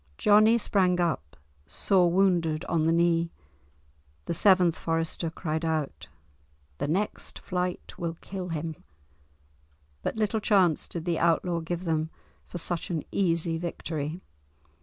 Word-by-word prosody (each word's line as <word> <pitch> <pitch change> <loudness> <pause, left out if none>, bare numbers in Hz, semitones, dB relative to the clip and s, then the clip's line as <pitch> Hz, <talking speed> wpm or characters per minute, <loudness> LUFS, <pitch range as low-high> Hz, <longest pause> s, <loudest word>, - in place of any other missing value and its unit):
Johnie 215 +2 +5
sprang 185 -5 +2
up, 160 - -1 0.3
sore 180 - +2
wounded 175 -4 +2
on 160 -2 +1
the - - +4
knee. 170 0 +2 1.0
The - - -2
seventh 180 -2 +4
forester 165 0 -1
cried 160 -1 -3
out, 160 - -2 0.7
"The - - -1
next 195 +7 -2
flight 180 -1 -3
will 165 -1 -3
kill 185 -2 -6
him," 160 -1 -4 1.2
but - - -2
little 220 0 0
chance 190 -7 +3
did 170 -1 -6
the 170 -2 0
outlaw 170 +1 +2
give 170 +2 -4
them 160 -2 0 0.4
for - - -6
such 175 0 -2
an 165 -4 -2
easy 170 -3 +1
victory. 165 -1 -4
170 Hz, 130 wpm, -27 LUFS, 160-185 Hz, 1.2 s, Johnie